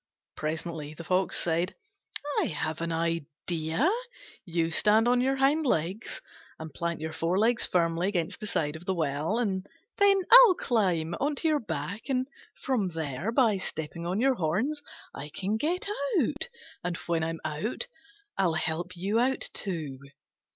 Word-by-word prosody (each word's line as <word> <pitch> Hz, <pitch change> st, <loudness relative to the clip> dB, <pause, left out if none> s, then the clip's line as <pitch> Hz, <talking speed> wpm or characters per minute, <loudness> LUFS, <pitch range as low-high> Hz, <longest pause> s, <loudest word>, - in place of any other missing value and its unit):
Presently 155 Hz, -1 st, -4 dB
the 170 Hz, -, -8 dB
Fox 185 Hz, +2 st, +1 dB
said, 170 Hz, +2 st, 0 dB, 0.6 s
"I -, -, +2 dB
have 155 Hz, +1 st, -2 dB
an 165 Hz, 0 st, -1 dB
idea. 165 Hz, -, -1 dB, 0.6 s
You 165 Hz, -2 st, 0 dB
stand 215 Hz, +7 st, +4 dB
on 245 Hz, 0 st, +4 dB
your 265 Hz, +1 st, +2 dB
hind 275 Hz, +4 st, +3 dB
legs, 190 Hz, -, -1 dB, 0.4 s
and 160 Hz, -2 st, -8 dB
plant 170 Hz, +1 st, -2 dB
your 160 Hz, 0 st, -4 dB
forelegs 200 Hz, +9 st, +2 dB
firmly 170 Hz, 0 st, +1 dB
against 175 Hz, -5 st, -1 dB
the 215 Hz, -, -5 dB
side 150 Hz, -6 st, -1 dB
of 160 Hz, +2 st, -10 dB
the 190 Hz, -, 0 dB
well, 155 Hz, +5 st, 0 dB
and 195 Hz, -5 st, -1 dB, 0.3 s
then 400 Hz, -1 st, +6 dB
I'll 485 Hz, -5 st, +10 dB
climb 180 Hz, -, +1 dB
on 290 Hz, +2 st, +1 dB
to 320 Hz, -, 0 dB
your 305 Hz, -2 st, +3 dB
back, 165 Hz, -, -5 dB
and, 255 Hz, -1 st, +1 dB, 0.3 s
from 245 Hz, -8 st, 0 dB
there, 160 Hz, -, -3 dB
by 230 Hz, -5 st, +4 dB
stepping 170 Hz, -1 st, -5 dB
on 185 Hz, +4 st, 0 dB
your 265 Hz, +2 st, +4 dB
horns, 230 Hz, -, -1 dB, 0.3 s
I 145 Hz, -, -5 dB
can 195 Hz, +8 st, -2 dB
get 335 Hz, +9 st, -1 dB, 0.3 s
out. -, -, -1 dB, 0.3 s
And 175 Hz, -1 st, -2 dB
when 165 Hz, -2 st, 0 dB
I'm 165 Hz, 0 st, -2 dB
out, 155 Hz, -, -2 dB, 0.5 s
I'll 175 Hz, -4 st, +3 dB
help 170 Hz, +3 st, -2 dB
you 200 Hz, +6 st, +1 dB
out 260 Hz, +2 st, +1 dB
too." 155 Hz, -9 st, -3 dB
180 Hz, 160 wpm, -28 LUFS, 160-230 Hz, 0.6 s, I'll